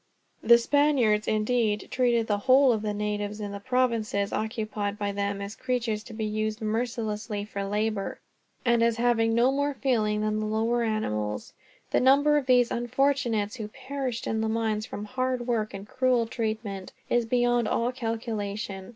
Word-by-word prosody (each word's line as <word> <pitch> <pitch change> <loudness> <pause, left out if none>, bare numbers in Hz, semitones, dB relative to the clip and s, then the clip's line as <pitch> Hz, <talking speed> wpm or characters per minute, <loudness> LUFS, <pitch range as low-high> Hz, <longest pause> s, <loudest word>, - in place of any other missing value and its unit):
The 235 - +7
Spaniards, 240 -5 +2
indeed, 215 -1 +1
treated 240 -3 +2
the 205 -2 0
whole 260 +3 +5
of 215 - -2
the 210 -1 -2
natives 210 0 -3
in 205 -1 -4
the 200 - -6
provinces 230 -4 0
occupied 215 -2 -2
by 205 -1 -2
them 200 0 -2
as 200 +2 -7
creatures 240 -4 -1
to 235 - -10
be 220 0 -3
used 215 0 -2
mercilessly 220 -2 -2
for 200 -1 -5
labor, 210 0 -2 0.5
and 235 -1 +3
as 230 0 +2
having 230 -1 +2
no 240 +3 +4
more 285 +1 0
feeling 215 -6 +1
than 215 0 0
the 215 - -2
lower 225 +3 +1
animals. 105 - -2 0.4
The - - +3
number 280 +3 +5
of 280 -3 -2
these 245 -2 +4
unfortunates 240 -3 0
who 215 -3 -5
perished 260 0 -4
in 220 0 -1
the 220 - 0
mines, 220 -1 -1
from 205 - -6
hard 255 +1 -2
work 225 -3 0
and 195 +1 -8
cruel 255 -2 +2
treatment, 220 -4 -4
is 240 -1 +1
beyond 240 -1 +2
all 235 +3 0
calculation. 215 -5 -4
225 Hz, 170 wpm, -27 LUFS, 210-245 Hz, 0.5 s, The